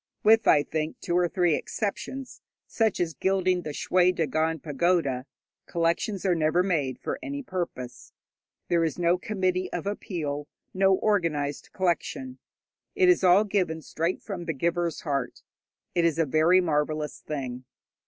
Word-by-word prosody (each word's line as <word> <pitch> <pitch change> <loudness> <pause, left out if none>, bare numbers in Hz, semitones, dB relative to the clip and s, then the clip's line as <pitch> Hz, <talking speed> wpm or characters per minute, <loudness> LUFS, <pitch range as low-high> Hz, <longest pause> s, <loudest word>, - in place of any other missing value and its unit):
With, 220 +1 +5
I 145 - +6
think, 155 +1 -3
two 175 - -2
or 175 -1 +3
three 175 -3 +2
exceptions, 245 - -4 0.2
such 220 -3 0
as 170 -2 0
gilding 185 0 +1
the 155 - -6
Shwe 180 +4 +2
Dagon 160 +1 0
pagoda, 145 -3 0 0.4
collections 170 +4 -1
are 185 - +4
never 165 +2 +2
made 150 -9 0
for - - -4
any 285 -2 -5
purpose. 150 - -5 0.6
There 170 -1 +2
is 160 - -1
no 175 0 +2
committee 185 -2 -1
of - - -4
appeal, 155 -8 -3 0.3
no 195 0 +4
organized 165 -9 0
collection. 210 +8 -2 0.6
It 370 -2 +4
is 360 - +4
all 185 +3 +6
given 180 -6 -1
straight 165 +3 -2
from 185 -5 -5
the 165 - -1
giver's 170 +3 -1
heart. 140 -5 -3 0.5
It 170 - +2
is 165 -2 +2
a 165 - +3
very 160 +6 +4
marvellous 150 -2 -1
thing. 130 -4 -5
175 Hz, 150 wpm, -27 LUFS, 155-190 Hz, 0.6 s, I